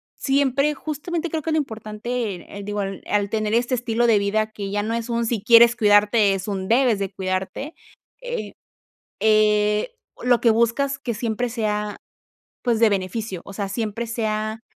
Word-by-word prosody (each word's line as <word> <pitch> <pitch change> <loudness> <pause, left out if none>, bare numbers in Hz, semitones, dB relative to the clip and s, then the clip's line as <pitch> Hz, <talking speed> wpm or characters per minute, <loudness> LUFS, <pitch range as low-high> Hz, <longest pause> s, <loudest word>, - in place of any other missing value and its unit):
siempre, 275 +1 +1
justamente 315 +4 -4
creo 315 -1 -3
que 325 - -2
lo 315 - +2
importante 220 -3 -3
en, 175 - -10
eh, 200 - -9
digo 205 +1 -4
al 195 -1 -5
al 205 -1 +1
tener 215 0 -1
este 240 +2 +2
estilo 240 -1 0
de 225 -2 +5
vida 215 +2 0
que 200 -2 -6
ya 205 0 0
no 220 +2 -2
es 230 0 -3
un: 235 0 0
"Si 225 -3 -1
quieres 235 0 +7
cuidarte", 205 -1 +4
es 195 +1 -5
un: 190 -2 -3
"Debes 240 0 +3
de 195 -1 -3
cuidarte", 190 - -3 0.5
eh, - - -5 0.7
eh, 210 - +2 0.3
lo 245 -1 +3
que 235 - +4
buscas 235 +5 +1
que 250 -4 -3
siempre 230 +2 -2
sea, 210 -3 -2 0.7
pues, 235 -3 +1
de 230 - +6
beneficio, 195 0 -3
o - - -9
sea, 200 0 -3
siempre 225 +2 -3
sea 220 -1 -2
220 Hz, 180 wpm, -22 LUFS, 205-245 Hz, 0.7 s, quieres